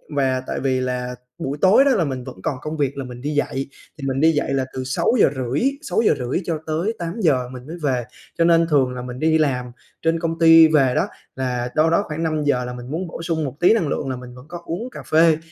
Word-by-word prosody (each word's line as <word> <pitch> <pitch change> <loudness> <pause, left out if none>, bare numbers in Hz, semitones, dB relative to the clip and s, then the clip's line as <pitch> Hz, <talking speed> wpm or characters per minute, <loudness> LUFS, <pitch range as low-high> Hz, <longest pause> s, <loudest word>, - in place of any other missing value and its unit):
và 130 -2 +1
tại - - -3
vì 130 0 0
là 125 -1 -3 0.2
buổi 140 +2 -4
tối 200 +8 +6
đó 280 - +4
là 210 -9 +2
mình 130 -4 -3
vẫn 95 - -10
còn - - -1
công 155 +1 -5
việc 140 -2 -1
là 135 - -3
mình 125 -1 -9
đi 145 - -3
dạy, 135 -2 -1 0.3
thì 140 -2 -5
mình 135 0 -1
đi 160 +3 +5
dạy 145 -3 -1
là 135 -1 0
từ 130 - -4
6:30, 135 - +1 0.2
6:30-8:00 165 - -1
mình 125 +1 -10
mới 165 +3 -7
về, 130 -4 +1 0.3
cho 170 - +3
nên 165 0 +4
thường 135 -4 +2
là 125 - -5
mình 125 0 -7
đi 160 +1 +3
làm 125 -5 0 0.3
trên 165 0 +1
công 165 0 -2
ty 165 -1 +8
về 140 -5 +3
đó - - +1 0.3
là 125 -2 -2
đâu 155 +1 +4
đó 170 +5 +2
khoảng 155 +1 -4
5:00 150 -5 0
là 125 - -5
mình 125 +1 -8
muốn 175 +4 -3
bổ 165 - -7
sung 165 -2 -1
một 135 -1 -5
tí 175 - +5
năng 205 -9 +1
lượng 140 -1 -2
là 130 - -2
mình 125 0 -10
vẫn 125 +1 -13
có 175 +2 -8
uống 215 +10 -4
cà - - -9
phê, 160 0 +4
145 Hz, 235 wpm, -21 LUFS, 130-165 Hz, 0.3 s, ty